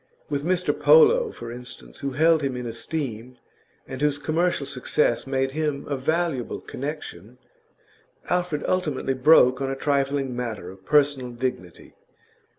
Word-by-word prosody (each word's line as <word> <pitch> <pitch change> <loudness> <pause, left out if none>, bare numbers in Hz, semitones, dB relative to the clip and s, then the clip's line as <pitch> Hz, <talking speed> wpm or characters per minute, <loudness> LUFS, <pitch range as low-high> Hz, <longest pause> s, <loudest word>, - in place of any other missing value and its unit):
With 140 -1 -1
Mr 180 +2 +1
Polo, 475 -1 +5
for 115 - -8
instance, 120 - -10
who 140 -1 -3
held 160 +3 +4
him 135 -3 -2
in 125 - -5
esteem, 125 0 -4 0.5
and 130 +1 -7
whose 150 -1 +2
commercial 155 +1 0
success 135 -2 0
made 135 0 0
him 150 -1 -2
a 145 - -1
valuable 150 -1 -1
connection, 125 - -7 0.9
Alfred 180 -4 -1
ultimately 150 -7 0
broke 130 -1 +5
on 135 - -1
a 135 - -2
trifling 140 -2 0
matter 110 -7 -5
of 95 0 -17
personal 145 -4 +2
dignity. 120 -8 -5
140 Hz, 140 wpm, -24 LUFS, 125-155 Hz, 0.9 s, Polo